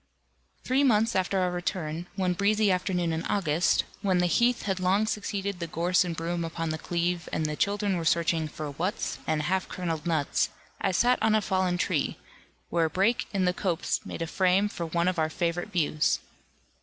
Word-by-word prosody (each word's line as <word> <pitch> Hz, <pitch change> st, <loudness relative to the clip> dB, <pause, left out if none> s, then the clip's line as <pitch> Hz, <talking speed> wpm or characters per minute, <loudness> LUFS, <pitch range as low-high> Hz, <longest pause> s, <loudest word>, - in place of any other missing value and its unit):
Three 265 Hz, +3 st, +2 dB
months 225 Hz, -3 st, +3 dB
after 190 Hz, +1 st, +1 dB
our 180 Hz, -1 st, +1 dB
return, 175 Hz, -2 st, -3 dB
one 185 Hz, -2 st, +1 dB
breezy 205 Hz, +2 st, +2 dB
afternoon 180 Hz, -2 st, 0 dB
in 160 Hz, +1 st, -2 dB
August, 175 Hz, -3 st, +2 dB, 0.2 s
when 190 Hz, -3 st, +2 dB
the 180 Hz, -, +3 dB
heath 235 Hz, +7 st, +2 dB
had 190 Hz, -2 st, -1 dB
long 190 Hz, +4 st, +2 dB
succeeded 200 Hz, -3 st, -3 dB
the 170 Hz, -, -3 dB
gorse 175 Hz, +3 st, +2 dB
and 175 Hz, -2 st, -3 dB
broom 170 Hz, +1 st, -2 dB
upon 165 Hz, 0 st, -3 dB
the 155 Hz, -, -3 dB
cleve, 175 Hz, +1 st, -1 dB
and 160 Hz, -, -1 dB
the 150 Hz, 0 st, -1 dB
children 200 Hz, +2 st, 0 dB
were 170 Hz, -, -3 dB
searching 165 Hz, -1 st, +2 dB
for 150 Hz, -1 st, -6 dB
"wuts" 175 Hz, +8 st, -2 dB
and 155 Hz, -1 st, +1 dB
half 185 Hz, +4 st, 0 dB
kerneled 165 Hz, -3 st, -3 dB
nuts, 155 Hz, -4 st, +1 dB, 0.3 s
I -, -, +2 dB
sat 245 Hz, +7 st, +3 dB
on 220 Hz, -1 st, +3 dB
a -, -, +5 dB
fallen 185 Hz, -3 st, 0 dB
tree, -, -, 0 dB, 0.5 s
where 170 Hz, -1 st, +2 dB
a -, -, 0 dB
break 195 Hz, +9 st, +1 dB
in 195 Hz, -2 st, +1 dB
the 180 Hz, -, +2 dB
copse 180 Hz, -2 st, -1 dB
made 165 Hz, -, -5 dB
a -, -, -2 dB
frame 185 Hz, +4 st, +2 dB
for 170 Hz, -4 st, -4 dB
one 170 Hz, +2 st, 0 dB
of 185 Hz, -2 st, 0 dB
our 155 Hz, 0 st, +1 dB
favourite 170 Hz, +3 st, -2 dB
views. 155 Hz, -5 st, +1 dB
180 Hz, 195 wpm, -28 LUFS, 165-195 Hz, 0.5 s, a